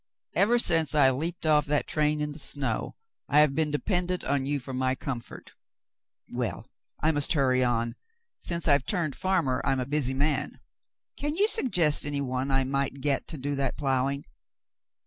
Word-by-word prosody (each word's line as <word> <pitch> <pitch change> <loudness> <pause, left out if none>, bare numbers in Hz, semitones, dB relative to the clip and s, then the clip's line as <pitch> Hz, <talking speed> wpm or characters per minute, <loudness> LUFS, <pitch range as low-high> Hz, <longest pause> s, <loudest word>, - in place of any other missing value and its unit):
Ever 230 +4 +3
since 160 - +3
I 135 -3 +6
leaped 160 +6 -4
off 150 -1 +3
that 150 0 +1
train 150 0 0
in 150 0 -2
the 145 - -7
snow, 140 -4 -2 0.3
I 150 - +5
have 150 -2 +4
been 155 +1 +1
dependent 180 +4 -1
on 140 -1 0
you 145 0 0
for 130 +1 -8
my 130 0 0
comfort. 130 -2 -7 0.8
Well, - - -4 0.4
I 160 - +4
must 145 +2 +2
hurry 130 -4 +2
on; 120 -1 0 0.5
since 170 -1 -2
I've 140 -3 +3
turned 170 -8 -1
farmer 170 -9 0
I'm 135 -1 +1
a 125 - -1
busy 140 -2 +2
man. 145 0 -1 0.6
Can 295 +1 -2
you 405 +4 +3
suggest 180 - +2
any 145 -1 -2
one 130 0 -2
I 135 0 +2
might 140 +1 -1
get 140 0 0
to 160 - -6
do 145 +2 -3
that 135 -2 -1
ploughing? 135 0 0
145 Hz, 175 wpm, -27 LUFS, 135-155 Hz, 0.8 s, I